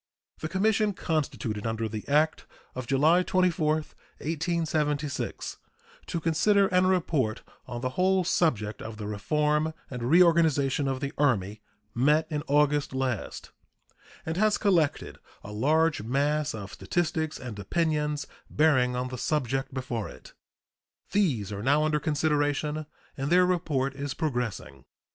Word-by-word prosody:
The 155 - -4
commission 210 +3 +2
constituted 130 - -2
under 115 0 -2
the 110 -1 -6
act 150 +2 +1 0.3
of 130 -1 -6
July 155 +7 +4
24, 180 -4 +2 0.5
1876, 155 -2 -2 0.5
to 170 - -2
consider 195 +5 +3
and 185 0 +3
report 155 -11 0 0.2
on 120 -1 -5
the 130 - -1
"whole 185 +7 +2
subject 115 - 0
of 110 0 -7
the 105 - -6
reform 150 +9 0 0.2
and 125 -2 -5
reorganization 150 -2 +3
of 135 0 -2
the 140 +1 -3
Army" 105 -7 +1 0.3
met 150 +7 +3
in 150 -1 -1
August 145 -1 +2
last, 130 -5 -3 0.7
and 160 +1 -3
has 215 +1 +3
collected 170 -8 +1 0.2
a 105 - -8
large 155 +8 +2
mass 145 +5 0
of 100 -2 -8
statistics 160 -2 -2
and 115 -5 -7
opinions 150 - -1 0.2
bearing 130 -5 +3
on 125 +1 -2
the 125 -1 -6
subject 135 -1 -1
before 125 -5 -4
it. - - -14 0.8
These 130 - +1
are 100 0 -4
now 145 +6 +3
under 155 -1 +1
consideration, 150 0 0 0.3
and 135 +1 -3
their 180 +1 +5
report 150 -7 0
is 140 0 -5
progressing. 120 - -3
150 Hz, 135 wpm, -27 LUFS, 125-160 Hz, 0.8 s, their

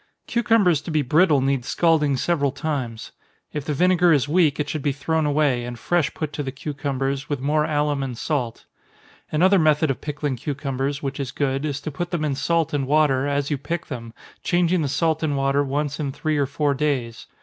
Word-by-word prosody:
Cucumbers 215 -9 +3
to - - -8
be 155 -2 +1
brittle 150 +1 +4
need 135 -1 0
scalding 150 -1 +2
several 145 -3 +1
times. 140 -6 -4 0.4
If 150 -2 -4
the 150 - -1
vinegar 180 +2 +4
is 145 -3 +3
weak, 155 -2 +2
it 150 - -1
should 155 - -3
be 145 - +1
thrown 155 +2 0
away, 145 -4 +2
and 120 0 -6
fresh 170 +3 0
put 155 -2 -4
to - - -3
the 135 -2 -3
cucumbers, 140 0 -3
with 145 -3 -1
more 150 +3 +1
alum 145 -2 0
and 130 -3 -4
salt. 125 -5 -2 0.7
Another 185 +5 +4
method 155 -2 +3
of 135 - -5
pickling 145 -3 -3
cucumbers, 140 +1 -3
which 135 0 -3
is 135 -2 -3
good, 135 0 -1
is 145 -2 -2
to 155 - -5
put 175 +5 -4
them 170 -4 -1
in 145 - 0
salt 165 +3 0
and 140 -2 0
water, 145 -2 +3
as 145 0 -1
you 145 - 0
pick 170 +4 -4
them 115 -4 -7 0.3
changing 175 0 +2
the 145 - 0
salt 160 +3 0
and 150 -3 0
water 135 +1 +2
once 145 +2 -2
in 145 -3 -2
three 155 +2 -1
or 140 - +1
four 145 +1 0
days. 130 -5 -2
145 Hz, 205 wpm, -23 LUFS, 135-155 Hz, 0.7 s, brittle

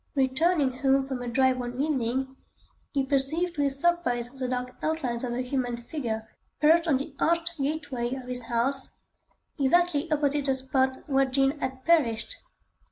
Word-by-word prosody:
Returning 280 +2 +2
home 270 +1 +1
from 260 -2 -4
a 245 - -5
drive 260 +1 +2
one 245 +1 -5
evening, 265 -2 -1 0.6
he 275 -2 0
perceived 290 +6 +1
to 295 - -2
his 275 -1 0
surprise 275 -8 +1
the 260 -1 -4
dark 250 0 -3
outlines 265 -7 0
of 245 - -2
a 250 +1 -2
human 250 -2 -2
figure 235 -3 -4 0.3
perched 330 +3 +4
on 290 -5 +3
the 275 +2 -6
arched 335 +1 +1
gateway 275 -4 -2
of 260 - -7
his 250 -1 -2
house, 245 +4 0 0.6
exactly 330 +2 +2
opposite 290 -1 +1
the 270 -1 +3
spot 260 +1 -1
where 270 -2 +3
Jean 270 +2 +1
had 260 -1 -4
perished. 305 - +2
270 Hz, 165 wpm, -27 LUFS, 250-300 Hz, 0.6 s, perched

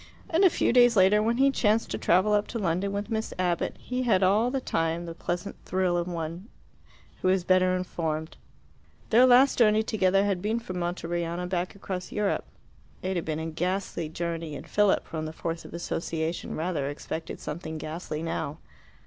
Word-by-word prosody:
And 335 +4 +3
a 380 - +8
few 280 - +1
days 245 -1 +6
later, 200 +2 +5
when 230 +2 +1
he 275 +1 +4
chanced 220 -3 +1
to - - -2
travel 185 +4 +3
up 205 0 +2
to 235 - -4
London 190 0 0
with 205 +3 -4
Miss 220 0 -2
Abbott, 180 -2 0
he 250 0 -3
had 205 -7 +3
all 210 +6 +3
the 270 +1 -1
time 165 -7 -1
the 165 - -6
pleasant 175 +1 -4
thrill 185 -1 0
of 175 0 -1
one 170 +4 -5 0.7
who - - +1
is 185 -1 +2
better 185 0 +3
informed. 160 -3 -3 0.8
Their 245 +3 +7
last 255 +2 +5
journey 215 -1 +5
together 195 -2 +2
had 195 -3 0
been 215 +3 0
from 185 -6 -6
Monteriano 175 0 -2
back 180 +1 -2
across 190 -2 -5
Europe. 210 -1 0 0.6
It 190 +1 -1
had 170 - -2
been 155 -1 -2
a 160 - -4
ghastly 170 0 -2
journey, 165 -1 -4
and - - -8
Philip, 205 -1 +2
from 155 -1 -4
the 155 - -7
force 165 +1 -4
of - - -11
association, 165 -1 -3
rather 160 -4 -1
expected 155 +2 -6
something 160 0 -5
ghastly 155 0 -5
now. 155 -2 -3
185 Hz, 185 wpm, -27 LUFS, 165-210 Hz, 0.8 s, a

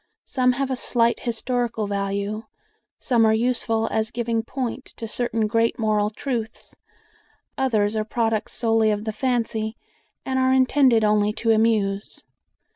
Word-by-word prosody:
Some 255 -2 +2
have 270 +1 -2
a - - +1
slight 235 -1 +1
historical 235 -1 -2
value; 200 +2 -3 0.5
some 240 -3 +2
are 220 0 +4
useful 225 -1 0
as 220 0 0
giving 235 -1 -1
point 255 +2 -4
to 225 - -5
certain 225 0 -1
great 230 +2 +1
moral 215 -2 +1
truths; 225 -1 -5 0.8
others 220 -6 +1
are 215 - 0
products 225 -1 -1
solely 225 -2 +2
of 210 0 -1
the 220 -1 -3
fancy, 225 -2 -1 0.5
and 260 0 0
are 260 0 +3
intended 260 -3 +4
only 210 0 +3
to 225 +1 0
amuse. 215 -3 +1
225 Hz, 140 wpm, -23 LUFS, 215-245 Hz, 0.8 s, are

